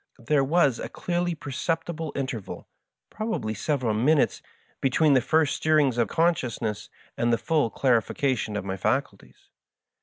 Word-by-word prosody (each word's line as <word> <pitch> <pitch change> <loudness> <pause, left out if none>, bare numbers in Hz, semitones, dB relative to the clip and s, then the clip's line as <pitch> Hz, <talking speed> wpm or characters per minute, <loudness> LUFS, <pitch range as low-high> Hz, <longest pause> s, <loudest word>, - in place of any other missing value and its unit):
There 145 0 +3
was 140 -3 +2
a - - -5
clearly 175 -1 -2
perceptible 160 +2 -3
interval 130 -7 -5 0.2
— - - -62
^probably 215 - -3
several 125 -1 -1
minutes 135 +7 +2 0.2
— - - -37
^between 140 +3 +3
the 130 - +4
first 155 +2 +2
stirrings 150 -6 +2
of 115 - +2
consdousness 130 - -1 0.3
and 120 0 +1
the 115 - +3
full 150 -5 +1
clarification 125 -2 0
of 105 - -4
my 95 0 -3
faculties. 100 - -3
135 Hz, 145 wpm, -26 LUFS, 115-155 Hz, 0.3 s, the